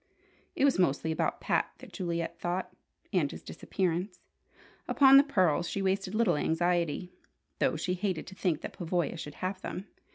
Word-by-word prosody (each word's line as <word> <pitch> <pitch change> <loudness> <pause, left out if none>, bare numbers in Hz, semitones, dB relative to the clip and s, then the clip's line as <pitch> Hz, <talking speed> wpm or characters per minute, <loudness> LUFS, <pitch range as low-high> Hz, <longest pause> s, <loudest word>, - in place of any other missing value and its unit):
It 275 - +3
was 275 -8 +3
mostly 160 -2 +2
about 160 - -1
Pat - - 0
that - - -13
Juliet 170 -3 -3
thought, 175 +2 -2 0.4
and - - +2
his - - -9
disappearance. 180 +1 -2 0.7
Upon 270 -1 +7
the 275 - +8
pearls 185 - +2
she 200 - -2
wasted 190 +1 0
little 225 -8 +3
anxiety, 175 +1 0 0.5
though - - +2
she 180 - -1
hated 185 -2 -2
to 190 - -10
think 180 -5 -1
that - - -6
Pavoya 175 -2 -1
should 150 -3 -7
have 185 +1 -3
them. 190 - -5
180 Hz, 165 wpm, -30 LUFS, 170-195 Hz, 0.7 s, the